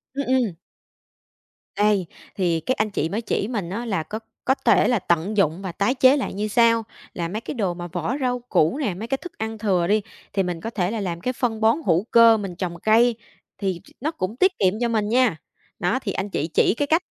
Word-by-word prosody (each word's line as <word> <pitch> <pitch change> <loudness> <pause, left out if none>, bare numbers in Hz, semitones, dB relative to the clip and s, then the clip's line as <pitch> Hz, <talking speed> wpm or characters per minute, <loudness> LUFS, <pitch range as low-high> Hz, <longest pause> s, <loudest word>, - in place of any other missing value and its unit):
Ừm, 280 - -1
ừm. 255 -5 +2 1.2
Đây, 205 -3 +2 0.3
thì 175 -4 +1
các 255 +11 -1
anh 215 0 +1
chị 160 -5 -1
mới 210 +5 -2
chỉ 205 -2 -1
mình 210 -8 -3
á 230 +6 -4
là 195 -8 -1
có 210 +8 -6 0.3
có 265 - +3
thể - - +5
là 245 -3 +2
tận 175 +5 0
dụng 170 -1 +2
và 190 -2 -4
tái 205 +9 0
chế 260 +2 +5
lại 275 - -3
như 205 +2 -2
sau. 230 +1 +3 0.3
Là 170 -1 -3
mấy 210 +6 -4
cái - - -5
đồ 200 -9 -1
mà 175 0 -6
vỏ 175 +8 -3
rau 250 -1 0
củ 160 - +2
nè, 260 -11 -1
mấy 215 +6 -6
cái 270 - 0
thức 355 +4 -11
ăn 220 0 -4
thừa 190 -5 +1
đi, 210 +1 +3 0.3
thì 195 -1 +1
mình 175 -2 -4
có 225 - -4
thể 190 -4 -1
là 225 - -2
làm 170 -3 -4
cái 255 - -1
phân 230 -3 -2
bón 225 +4 +4
hữu 170 +1 +3
cơ, 230 -1 +7
mình 195 -4 -5
trồng 170 -1 -4
cây, 230 +2 +4 0.4
thì 190 -4 -2
ch - - -19
nó 305 +4 -1
cũng 205 - -4
tiết 375 +4 +4
kiệm 190 -2 +3
cho 240 - +2
mình 215 -2 0
nha. 240 -7 +3 0.4
Đó, 180 +9 +1
thì 210 - -3
anh 195 +2 -3
chị 160 -5 -2
chỉ - - +4
cái 290 - 0
cách 325 +4 +3
210 Hz, 240 wpm, -23 LUFS, 180-235 Hz, 1.2 s, cơ